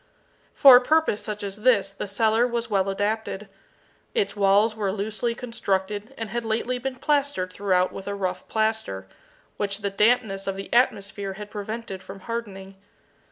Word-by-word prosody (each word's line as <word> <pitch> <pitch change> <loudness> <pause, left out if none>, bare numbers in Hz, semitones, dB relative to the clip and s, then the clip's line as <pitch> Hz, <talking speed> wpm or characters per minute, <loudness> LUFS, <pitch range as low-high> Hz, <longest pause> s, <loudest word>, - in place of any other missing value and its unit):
For 270 -4 +10
a - - +3
purpose 310 -5 +2
such 210 -1 -5
as 200 0 -4
this 205 -5 +3
the 200 - -6
cellar 220 +4 +2
was 235 -1 -3
well 195 -1 +2
adapted. 210 +1 -2 0.7
Its 200 0 0
walls 205 +2 +3
were 205 -3 -1
loosely 215 +4 -2
constructed 210 -3 -2
and 225 -3 -5
had 235 +1 -2
lately 230 +3 -1
been 265 +1 -4
plastered 280 -9 0
throughout 185 -2 +1
with 195 - -8
a 200 - -2
rough 185 -2 -3
plaster, 220 - -1 0.5
which 200 0 -2
the 200 0 -1
dampness 210 -2 +2
of 195 - -1
the 195 0 -7
atmosphere 200 -5 +1
had 210 +1 -9
prevented 210 -2 -5
from 195 +1 -10
hardening. 195 -4 -6
210 Hz, 160 wpm, -25 LUFS, 195-230 Hz, 0.7 s, For